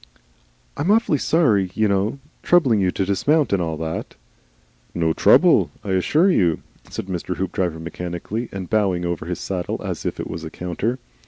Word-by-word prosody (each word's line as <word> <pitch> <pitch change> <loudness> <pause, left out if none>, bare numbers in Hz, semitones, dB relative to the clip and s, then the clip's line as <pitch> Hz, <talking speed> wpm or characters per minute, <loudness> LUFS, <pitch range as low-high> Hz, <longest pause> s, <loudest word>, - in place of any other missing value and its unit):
"I'm 155 +6 -1
awfully 210 -8 +3
sorry, 110 - +2
you 110 -1 +2
know. 100 +5 0 0.2
Troubling 130 - +3
you 95 - +2
to 95 +1 -1
dismount, 140 - +2
and 95 - +2
all 80 -2 -2
that." 80 +1 -5 0.8
"No 80 -2 +1
trouble. - - +5 0.2
'Ssure 105 - +3
you," 85 - +2 0.3
said - - -5
Mr. 90 -1 -4
Hoopdriver, 90 -3 -2
mechanically 90 +7 -5
and 95 -2 -6
bowing 95 -4 +1
over 85 -2 -3
his 90 -1 -3
saddle 90 -2 -3
as - - -4
if - - -3
it - - -3
was 80 +1 -6
a 80 - -5
counter. 90 +9 -3
95 Hz, 165 wpm, -22 LUFS, 85-115 Hz, 0.8 s, trouble